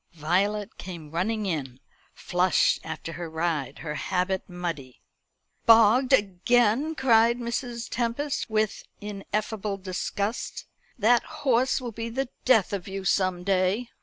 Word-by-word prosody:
Violet 195 +6 -1
came 170 -5 -8
running 210 +6 -1
in, 135 -8 -3 0.4
flushed 180 0 +2
after 160 0 -6
her 170 -1 -6
ride, 160 -4 -2
her 150 - -3
habit 185 +4 -1
muddy. 165 -8 -5 0.7
"Bogged 230 +3 +6
again!" 240 - +3
cried 235 -3 +4
Mrs. 235 -1 -4
Tempest, 245 +4 -2
with 215 -1 0 0.2
ineffable 205 0 -3
disgust. 200 +3 -3 0.3
"That 235 +1 +4 0.2
horse 255 0 +3
will 245 -2 -5
be 230 +1 -5
the 265 +2 -2 0.2
death 225 -7 +4
of 195 -3 -3
you 195 0 -5
some 185 -2 +1
day." 195 +5 +1
205 Hz, 125 wpm, -26 LUFS, 180-235 Hz, 0.7 s, Bogged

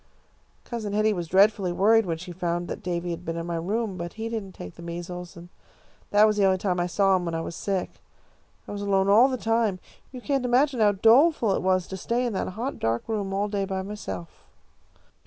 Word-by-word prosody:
"Cousin 220 -4 -4
Hetty 215 +1 +2
was 175 -3 -4
dreadfully 195 +1 +3
worried 215 +4 +3
when 165 -1 -1
she 180 +2 -9
found 175 0 -2
that - - -6
Davy 175 -1 -3
had 170 +1 -6
been 165 -1 -4
in 165 - -4
my 170 -1 -3
room, 200 +3 -2
but 170 0 -5
he 225 +1 -5
didn't 210 -5 -5
take 90 - -9
the - - -13
measles, 175 +1 -7
and 170 +1 -11 0.6
that 210 +1 +6
was 215 -1 +2
the 205 - +3
only 190 -1 +3
time 185 -1 -1
I 175 - 0
saw 195 +1 +3
him 180 -1 -1
while 165 -1 -3
I - - -1
was 165 - -6
sick. 195 -3 -3 0.7
I - - -7
was 205 0 -5
alone 195 -1 +2
all 225 +6 +7
the 260 -1 -2
time. 225 -4 +1 0.3
You 255 - -8
can't 275 +1 -1
imagine 255 +2 +2
how 210 -2 +4
doleful 230 - +4
it - - -1
was 185 -1 +1
to 190 - -7
stay 235 +6 -1
in 235 - -2
that 190 - -2
hot 235 +8 -4
dark 115 +1 -1
room 205 -3 -2
all 200 +2 0
day 200 -1 -2
by 190 -1 -3
myself." 95 - -8
195 Hz, 230 wpm, -26 LUFS, 175-220 Hz, 0.7 s, all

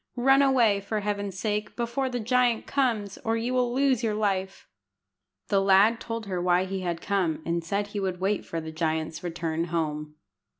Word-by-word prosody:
Run 270 +3 +5
away, 240 -7 +4
for 210 +1 -3
Heaven's 200 -2 -3
sake, 210 +1 -2
before 240 +3 -1
the 245 -1 -3
giant 240 0 +2
comes, 225 -8 -1
or 225 0 -1
you 235 +3 -2
will 250 -1 +1
lose 265 -1 +2
your 215 -2 0
life." 195 -2 -2 0.8
The 200 -2 +3
lad 200 +4 +5
told 230 -1 -5
her 185 -3 -3
why 180 +1 +3
he 190 0 -3
had 175 -2 -3
come, 185 -6 0
and 170 0 -1
said 200 +4 -2
he 205 - -4
would 185 -2 -2
wait 195 +2 0
for 165 - -4
the 160 0 -6
giant's 160 0 -2
return 165 -1 -2
home. 150 -3 -3
200 Hz, 185 wpm, -27 LUFS, 175-230 Hz, 0.8 s, Run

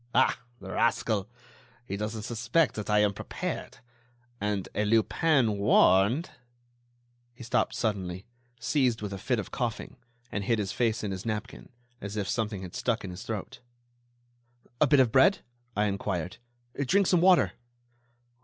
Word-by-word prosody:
Ah! - - +4 0.2
the - - -8
rascal... 110 -3 +1 0.6
he 100 - -4
doesn't 105 +1 -4
suspect 120 +8 +1
that 105 -1 -5
I 105 0 +4
am 105 -1 +2
prepared... - - -5 0.6
and 105 -2 -1
a 105 - 0
Lupin 115 +1 +2
warned—" 100 - +4 1.0
He 120 - -10
stopped 120 - 0
suddenly, 95 -4 -2 0.3
seized 125 -3 +1
with 100 -1 -4
a 100 - -6
fit 125 +5 0
of 105 - -5
coughing, 120 0 -3 0.3
and 100 - -2
hid 115 +3 +1
his 100 -3 -2
face 115 -3 0
in 105 - -2
his 95 0 -5
napkin, 110 0 -5 0.3
as 100 +1 -5
if 100 -2 -1
something 105 -4 -2
had 90 - -8
stuck 120 -3 -1
in 95 - -5
his 90 - -8
throat. 110 -4 -5 1.2
"A 150 - +6
bit 145 0 +5
of 125 -4 +4
bread?" 135 - +4 0.3
I 105 - +3
inquired. 95 -3 -2 0.5
"Drink 200 +7 +4
some 180 -1 +3
water." 185 0 +5
110 Hz, 155 wpm, -28 LUFS, 100-120 Hz, 1.2 s, A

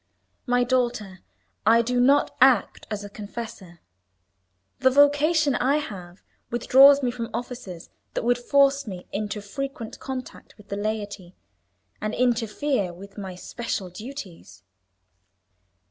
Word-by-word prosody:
"My 245 0 +3
daughter, 240 -6 -1 0.4
I 230 +2 +5
do 245 +2 0
not 275 +4 +3
act 255 -5 +4
as 210 -2 -4
a - - -6
confessor. 205 -4 -9 1.0
The 260 - +5
vocation 290 +2 +4
I 260 +3 +2
have 190 -11 -6 0.3
withdraws 270 +4 +6
me 245 - +1
from 235 -1 -5
offices 205 -9 -7 0.2
that - - -1
would 245 +1 +2
force 275 +1 +3
me 180 -3 -7
into 210 0 -4
frequent 235 +2 -6
contact 260 -2 -8
with 210 -2 -18
the 200 - -3
laity, 205 -3 -4 0.7
and 215 +1 -2
interfere 240 -2 0
with 195 +3 -12
my 190 -2 -6
special 195 -1 -5
duties." 210 - -10
230 Hz, 125 wpm, -25 LUFS, 200-260 Hz, 1.0 s, withdraws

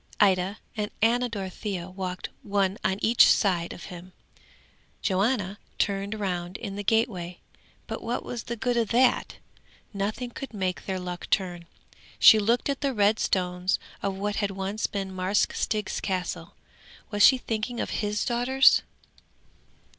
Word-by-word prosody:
'Ida 190 0 +3 0.2
and 210 -2 -2
Ana 245 +2 +3
Dorothea 195 -3 -4
walked 185 -1 -5
one 200 0 0
on 190 - +1
each 230 +2 +6
side 175 -5 +2
of - - -9
him: 180 +1 -11 0.9
Johanna 200 0 0 0.2
turned 200 +1 -1
round 180 -3 -3
in 200 -4 -6
the 205 - -4
gateway, 195 -6 0 0.5
but - - -5
what 235 +1 -3
was 240 -2 -5
the 235 - -3
good 240 +1 -1
of 230 -2 +2
that? 250 +3 +2 0.6
nothing 215 +5 -3
could 265 -2 -8
make 185 -2 -2
their 190 -1 -2
luck 180 -1 -6
turn. 175 -3 -1 0.5
She 220 - +8
looked 230 +4 +1
at 280 -1 -2
the 275 -3 0
red 210 +1 +3
stones 180 0 0 0.2
of 195 -1 -1
what 205 +1 -2
had 205 -2 0
once 195 +2 -2
been 195 -1 -4
Marsk 185 +2 +1
Stig's 210 -2 -2
Castle. 185 -2 -3 0.6
Was 205 -1 +2
she 260 - +8
thinking 235 0 -3
of - - -2
his 210 -1 -1
daughters? 255 +3 +4
200 Hz, 150 wpm, -27 LUFS, 185-225 Hz, 0.9 s, She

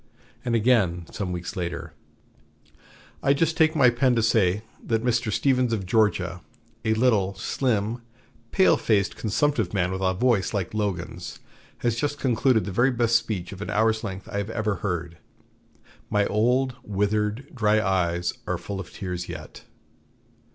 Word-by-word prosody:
And 120 -2 0
again, 105 -7 +2
some 95 -3 -4
weeks 85 -1 -5
later: 85 -2 -4 1.3
"I 140 +1 +3
just 160 +2 +1
take 160 0 +3
my 130 -5 +6
pen 125 +1 +2
to 115 - +2
say 105 -3 +2 0.2
that 115 -1 0
Mr. 120 -2 +1
Stephens 125 0 +2
of 100 -4 -2
Georgia, 90 -4 +1 0.4
a 110 0 +2
little, 110 -5 +2
slim, 115 +2 -1 0.5
pale 190 - +4
faced 100 -3 +1
consumptive 140 +3 0
man 90 -1 +1
with 95 0 -3
a 95 -1 +1
voice 110 -2 +1
like 95 -1 -2
Logan's, 100 -5 -3 0.4
has 120 -2 0
just 145 +3 -1
concluded 125 -4 +2
the 100 - -4
very 120 +8 +3
best 120 -2 +1
speech 110 -6 -1
of 100 -1 -9
an - - -5
hour's 110 +1 +2
length 95 -3 -6
I 100 - -1
ever 105 -1 -2
heard. 85 -4 -4 0.9
My 105 -1 +2
old, 125 +5 +1
withered, 105 +5 -1
dry 110 -4 +3
eyes 90 -3 0
are - - 0
full 100 -1 -6
of 90 - -8
tears 90 -2 -5
yet." - - -9
110 Hz, 155 wpm, -25 LUFS, 95-120 Hz, 1.3 s, my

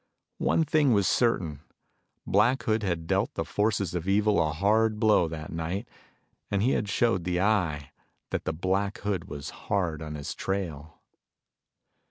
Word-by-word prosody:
One 165 - +2
thing 150 -4 +3
was 100 -3 +3
certain: 85 - +1 0.6
Black 115 +7 +3
Hood 110 0 +1
had 85 -5 -2
dealt - - 0
the - - -2
forces 105 -4 0
of 90 0 -3
evil 105 +1 +3
a 75 - +1
hard 105 +6 +2
blow 105 -6 +4
that 80 -1 -7
night, 85 +7 -3 0.6
and 100 0 0
he 130 - +3
had 105 - 0
showed 100 -4 +1
the 90 0 -1
Eye 90 -9 +1 0.4
that - - -2
the - - 0
Black 95 +5 -1
Hood 100 -5 -2
was 70 -1 -7
hard 85 -6 -2
on 75 -1 -5
his 70 -1 -5
trail. 85 -6 -4
95 Hz, 160 wpm, -27 LUFS, 80-105 Hz, 0.6 s, blow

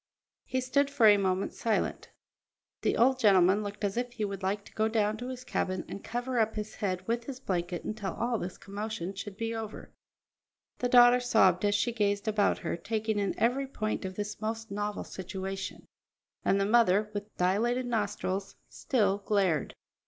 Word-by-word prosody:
He 260 - -1
stood 280 +2 +2
for 280 -5 +3
a 210 -1 +9
moment 190 0 0
silent. 225 -2 -1 0.7
The - - +1
old 255 +2 +4
gentleman 195 -3 +5
looked 205 0 -6
as 200 +2 -1
if 245 0 -2
he 220 -3 -2
would 200 -1 -5
like 200 +2 -1
to - - -15
go 220 0 +1
down 215 -1 +1
to 245 - -6
his 255 -1 -6
cabin 185 -6 -2
and 200 - -7
cover 245 +1 -2
up 220 0 +1
his 215 0 -4
head 185 -2 -3
with 235 +1 -1
his 260 -1 -6
blanket 175 -6 -2
until 210 -3 -4
all 235 -1 -1
this 180 +1 -5
commotion 200 -1 -5
should 200 0 -7
be 225 0 -2
over; 220 -1 -7 0.9
the 245 - 0
daughter 245 0 +7
sobbed 200 -7 +3
as 205 0 +3
she 240 +3 +1
gazed 205 -2 0
about 210 -1 +2
her, 170 - -3
taking 220 +4 -2
in 200 -1 -1
every 260 +4 +1
point 215 -6 -3
of 190 0 -5
this 210 +2 -5
most 225 0 -4
novel 205 +1 -2
situation; 190 +1 -6 0.6
and 195 - +3
the 195 - +2
mother, 210 -2 +3
with 205 +1 -6
dilated 230 +8 +1
nostrils, 200 -4 -2
still 205 -6 +1
glared. 195 -7 0
210 Hz, 180 wpm, -30 LUFS, 195-235 Hz, 0.9 s, a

